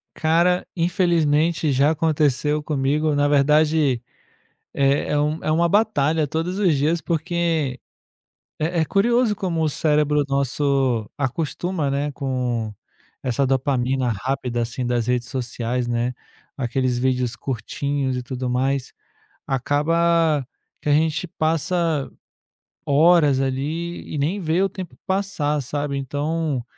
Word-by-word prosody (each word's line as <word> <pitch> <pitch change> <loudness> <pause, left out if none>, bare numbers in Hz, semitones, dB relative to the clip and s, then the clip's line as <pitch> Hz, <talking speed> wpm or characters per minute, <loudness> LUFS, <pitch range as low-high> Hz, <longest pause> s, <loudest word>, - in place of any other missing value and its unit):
Cara, 170 +3 +2
infelizmente 165 -3 +2
já 140 +3 +3
aconteceu 150 -1 +1
comigo. 150 +1 0
Na 145 0 +2
verdade, 150 -2 +3 0.7
é 140 +1 +1
é 150 - +2
um 150 +2 -1
é - - -1
uma 170 +2 +3
batalha 165 -7 +2
todos 165 +6 -2
os 185 -7 +3
dias, 155 +5 +1
porque 165 - -1 0.8
é 165 +3 -1
é 160 - +1
curioso 230 +3 +2
como 180 -5 -2
o 155 - +2
cérebro 150 -1 +2
nosso 135 -4 0
acostuma, 150 +3 -2
né, 145 +1 -1
com 125 -6 -2 0.5
essa 130 +2 0
dopamina 130 -1 0
rápida, 120 +2 -2
assim, 120 +2 -3
das 120 -1 0
redes 125 -1 0
sociais, 125 -1 -3
né, 120 +1 -1 0.4
aqueles 130 -1 -1
vídeos 125 -1 0
curtinhos 135 +2 -2
e 125 - -4
tudo 125 0 -4
mais, 130 +1 -1 0.5
acaba 155 +2 +2 0.4
que - - -7
a - - +5
gente 155 +3 +1
passa 160 -1 0 0.8
horas 150 -1 +5
ali 150 +6 -3
e - - -2
nem 165 +9 0
vê 165 +1 0
o 195 - +2
tempo 185 -2 -8
passar, 190 -7 0
sabe? 145 +1 -3
Então 145 0 -2
145 Hz, 125 wpm, -22 LUFS, 130-165 Hz, 0.8 s, a